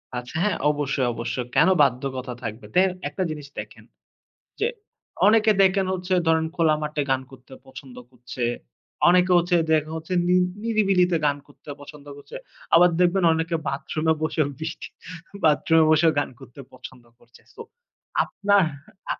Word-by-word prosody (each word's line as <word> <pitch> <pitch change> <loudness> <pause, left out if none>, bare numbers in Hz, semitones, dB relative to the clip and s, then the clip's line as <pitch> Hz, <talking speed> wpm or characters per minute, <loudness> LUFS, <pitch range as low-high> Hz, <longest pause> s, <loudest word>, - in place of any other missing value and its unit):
আচ্ছা 125 +4 -7
হ্যাঁ, 210 - 0
অবশ্যই, 140 -3 -1
অবশ্যই। 120 +2 -4
কেন - - +5
বাধ্যকথা 130 -1 -1
থাকবে, 115 +2 -6
তেই 185 +1 +5 0.2
একটা 150 +6 -3
জিনিস 150 -2 -8
দেখেন - - -10 0.8
যে 435 - +1 0.6
অনেকে 220 0 +4
দেখেন 190 0 +3
হচ্ছে 185 0 -3
ধরেন 160 0 +2
খোলা 160 -2 +3
মাঠে 150 0 -2
গান 130 0 +1
করতে 130 0 -15
পছন্দ 130 -1 -12 0.2
করছে। 125 0 -7 0.7
অনেকে 180 +1 +3
হচ্ছে 175 +1 +1 0.2
দেখে 155 0 +1
হচ্ছে 160 +3 -5
নি 180 - +3 0.3
নিরিবিলিতে 195 -6 +2
গান 145 -1 +1
করতে 145 0 -13
পছন্দ 145 0 -13
করছে। 145 - -13 0.4
আবার 180 +1 +6
দেখবেন 180 +1 +2
অনেকে 165 +1 -2
বাথরুমে 155 +3 -1
বসে 155 0 0 0.2
বৃষ্টি 160 +2 -6 0.6
বাথরুমে 160 +1 +4
বসেও 160 +1 +4
গান - - -2
করতে 135 +1 -13
পছন্দ 130 -1 -12 0.2
করছে। 120 0 -22
So - - -11 0.6
আপনার 200 -1 +2 0.5
আপ - - -4
155 Hz, 145 wpm, -23 LUFS, 135-180 Hz, 0.8 s, আবার